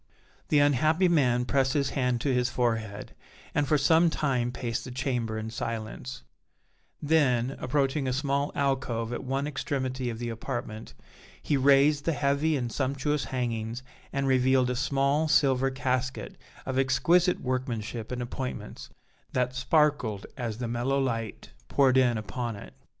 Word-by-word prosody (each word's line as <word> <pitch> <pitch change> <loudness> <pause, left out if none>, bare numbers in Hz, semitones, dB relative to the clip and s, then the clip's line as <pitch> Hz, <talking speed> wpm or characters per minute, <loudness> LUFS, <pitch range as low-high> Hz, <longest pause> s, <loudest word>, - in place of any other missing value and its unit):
The 150 - +3
unhappy 155 +5 +3
man 125 -7 +2
pressed 135 0 +1
his 140 -2 0
hand 125 -3 0
to 135 - +1
his 125 0 +1
forehead, 115 -5 -2 0.4
and 145 -1 +1
for 150 - +3
some 160 +4 +4
time 130 -6 0
paced 120 -2 -3
the - - -8
chamber 125 -3 -2
in 110 0 -5
silence; 115 +3 -5 0.8
then, 135 -5 +2
approaching 135 +1 0
a - - +1
small 140 +2 0
alcove 130 -4 -1
at - - -4
one 135 +2 -1
extremity 130 -3 -2
of 115 - -5
the 120 0 -4
apartment, 115 -1 -6 0.4
he 150 - 0
raised 140 +2 +4
the 165 - +1
heavy 145 +2 +1
and 120 -3 -3
sumptuous 140 +3 -1
hangings 120 -1 -3 0.3
and 140 0 -1
revealed 130 -1 +3
a - - -2
small 140 +4 +1
silver 135 -3 +3
casket 130 -1 -2 0.3
of 130 0 -1
exquisite 150 +8 +3
workmanship 120 -3 -3
and 125 -1 -3
appointments, 125 +1 -6 0.4
that 125 0 0
sparkled 130 -6 +1
as 115 -5 -4
the 120 -1 -3
mellow 120 +4 0
light 115 -5 -3 0.2
poured 135 -2 +3
in 125 -3 +4
upon 115 +2 -4
it. 100 - -11
130 Hz, 150 wpm, -28 LUFS, 120-140 Hz, 0.8 s, some